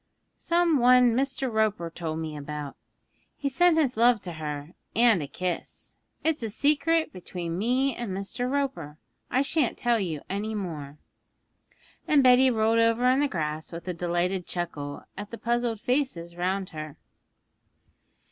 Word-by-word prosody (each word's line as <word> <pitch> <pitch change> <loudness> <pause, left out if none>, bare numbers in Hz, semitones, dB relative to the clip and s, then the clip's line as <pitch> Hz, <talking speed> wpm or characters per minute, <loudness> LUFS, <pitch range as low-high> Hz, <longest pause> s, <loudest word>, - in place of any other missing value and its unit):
'Some 340 -3 +2
one 250 0 +6
Mr. 265 -1 -1
Roper 210 -6 0
told 160 -2 -4
me 160 -1 -4
about. 145 -1 -6 0.6
He 280 - -1
sent 340 +4 +4
his 280 -6 +2
love 235 0 +4
to 175 - -6
her 150 0 -6 0.2
and 230 -6 +5
a 145 - -4
kiss. 180 +5 -5 0.3
It's 315 -3 +1
a 225 - -2
secret 305 +7 +2
between 175 -2 -5
me 250 +4 +1
and 240 -3 -5
Mr. 200 +6 -3
Roper, 220 - -2 0.3
I 260 +2 +2
shan't 285 -2 0
tell 240 -1 +2
you 165 -7 -3
any 210 +3 -3
more.' 155 -8 -5 1.1
And 290 -3 +5
Betty 255 +1 +6
rolled 225 -1 +2
over 230 +2 +3
in 260 - +2
the 290 - +3
grass 155 - -3
with 170 +1 -8
a 180 - -1
delighted 175 +2 -1
chuckle 145 -5 -4
at 205 +1 -7
the 230 - -7
puzzled 235 -1 -1
faces 235 -9 -1
round 185 +2 -1
her. 155 -2 -8
215 Hz, 155 wpm, -27 LUFS, 170-255 Hz, 1.1 s, one